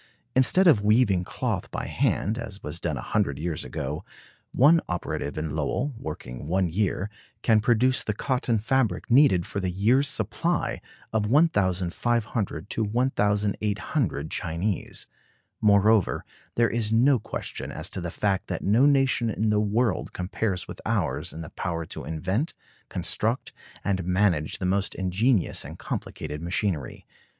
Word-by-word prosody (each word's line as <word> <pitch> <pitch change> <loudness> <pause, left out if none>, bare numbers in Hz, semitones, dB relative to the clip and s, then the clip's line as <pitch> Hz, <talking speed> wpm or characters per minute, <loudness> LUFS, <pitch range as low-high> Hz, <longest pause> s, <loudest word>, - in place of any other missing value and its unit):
Instead 130 +9 +4
of 145 - +6
weaving 105 -4 +4
cloth - - -3
by - - -4
hand, 110 +6 0
as 100 -4 -6
was 85 - -3
done - - -2
a - - -5
hundred 70 -2 0
years 80 +1 -2
ago, 75 +2 -4 0.5
"one 160 +6 +5
operative 85 -4 -3
in 75 -1 -2
Lowell, 140 +3 -1
working 75 - -7
one 95 +2 +2
year, 95 +2 0 0.4
can 110 -2 +5
produce 120 +3 +2
the 105 - -2
cotton 125 -1 0
fabric 115 -3 0
needed 120 - +5
for 100 - -4
the 95 -1 -1
year's 115 +10 +3
supply 170 +3 0 0.3
of 105 -2 +1
1,500 110 - +1
to 115 - 0
1,800 105 - 0
Chinese." 90 +4 -2 0.6
Moreover, 105 -1 +4 0.3
there 115 -1 +3
is 110 -2 0
no 125 +3 +4
question - - -5
as - - -3
to 95 - -4
the 85 - -3
fact 95 +2 -1
that - - -3
no 115 +8 +4
nation 135 -4 +3
in 110 0 0
the 105 - +3
world 105 0 0
compares 90 0 -2
with - - -9
ours - - -1
in 80 - -7
the 85 - -8
power 85 -2 -3
to - - -7
invent, 95 - -2 0.3
construct, 115 +4 -2 0.3
and 95 -2 0
manage 90 -4 +1
the 95 - -3
most 95 +2 0
ingenious 95 +3 +1
and - - -9
complicated 75 +1 -5
machinery. 85 -3 -2
105 Hz, 145 wpm, -26 LUFS, 90-120 Hz, 0.6 s, of